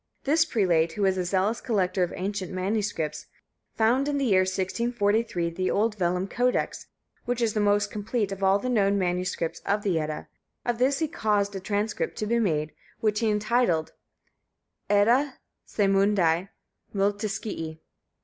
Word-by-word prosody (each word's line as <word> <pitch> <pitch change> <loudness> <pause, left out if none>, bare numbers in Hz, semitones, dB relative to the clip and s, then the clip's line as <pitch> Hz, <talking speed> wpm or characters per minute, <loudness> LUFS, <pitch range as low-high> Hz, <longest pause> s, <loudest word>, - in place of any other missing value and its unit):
This 320 +4 +3
prelate, 175 - +2
who 205 - -2
was 190 -1 +3
a - - +1
zealous 195 +5 0
collector 195 -5 0
of 175 - +1
ancient 195 0 -3
manuscripts, 185 -5 -2 0.5
found 245 +5 +2
in 290 -1 0
the 275 - 0
year 195 -6 +4
1643, 200 -1 0
the 185 +2 -1
old 215 +2 +1
vellum 180 -1 0
codex, 250 +4 -1 0.4
which 245 0 -1
is 230 -3 +1
the 215 - 0
most 205 0 +2
complete 210 0 -2
of 195 0 -6
all 195 0 +4
the 230 - -4
known 200 -5 +2
manuscripts 180 -2 -1
of 205 +1 -1
the 180 -5 +1
Edda; 155 -1 -4 0.4
of 240 -1 -1
this 270 +2 +3
he 320 - 0
caused 205 -9 0
a - - -3
transcript 205 +3 -2
to 215 - -2
be 235 +2 +1
made, 155 -8 0 0.3
which 210 -1 +1
he 225 - +1
entitled 210 -6 +1 1.0
Edda 240 +7 +3 0.3
Saemundi 195 -3 +2 0.5
Multiscii. 200 -5 -2
205 Hz, 155 wpm, -26 LUFS, 185-225 Hz, 1.0 s, year